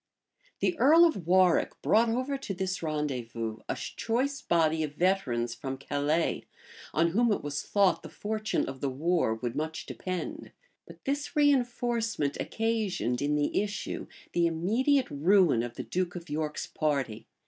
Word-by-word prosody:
[*] - - -36
The 360 - +2
earl 320 +6 +7
of 200 - -1
Warwick 185 -1 +3
brought 230 +2 +4
over 255 +4 -1
to 250 -8 -5
this 190 0 -2
rendezvous 125 -8 -3
a - - 0
choice 265 +5 -2
body 160 -2 +2
of 150 -2 -3
veterans 130 -11 +1
from 135 +2 -5
Calais, 145 +4 0 0.5
on 165 +2 +2
whom, 230 +6 +2
it 205 - 0
was 145 0 -3
thought 200 -2 +2
the - - -9
fortune 215 +1 -2
of 135 -1 -7
the 140 - 0
war 155 -3 +1
would 115 +1 -4
much 160 +1 -3
depend; 185 -1 -5 0.3
but - - -14
this 285 +1 -1
reënforcement 240 - +1
occasioned, 215 - -1
in 145 +1 +1
the 150 +5 +1
issue, 210 0 -4 0.3
the 170 -1 +3
immediate 235 - +1
ruin 165 - +4
of 120 0 -5
the - - -5
duke 180 0 -2
of 170 -3 -8
York's 150 0 -2
party. 135 -8 -2
175 Hz, 160 wpm, -29 LUFS, 145-225 Hz, 0.5 s, earl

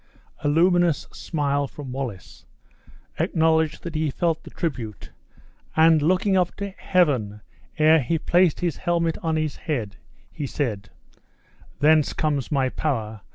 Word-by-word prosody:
A - - +1
luminous 175 +1 +3
smile 145 -3 -1
from 135 -1 -9
Wallace 125 -8 -7 0.7
acknowledged 160 -1 +1
that 170 - -6
he 155 -1 0
felt 165 +2 -1
the - - -11
tribute 125 - -5 0.6
and, 160 -1 +5
looking 185 +5 +2
up 180 -2 +1
to 200 -1 -5
Heaven 135 - 0 0.4
ere 155 +1 +5
he 150 +7 0
placed 175 +2 +2
his 170 -5 -1
helmet 170 -2 0
on 160 -1 0
his 155 -2 -2
head, 115 - -4 0.3
he 145 - -5
said: 110 -7 -3 0.9
"Thence 155 0 +4
comes 145 -3 -1
my 135 -3 +2
power! 110 -9 -3
155 Hz, 135 wpm, -24 LUFS, 135-165 Hz, 0.9 s, and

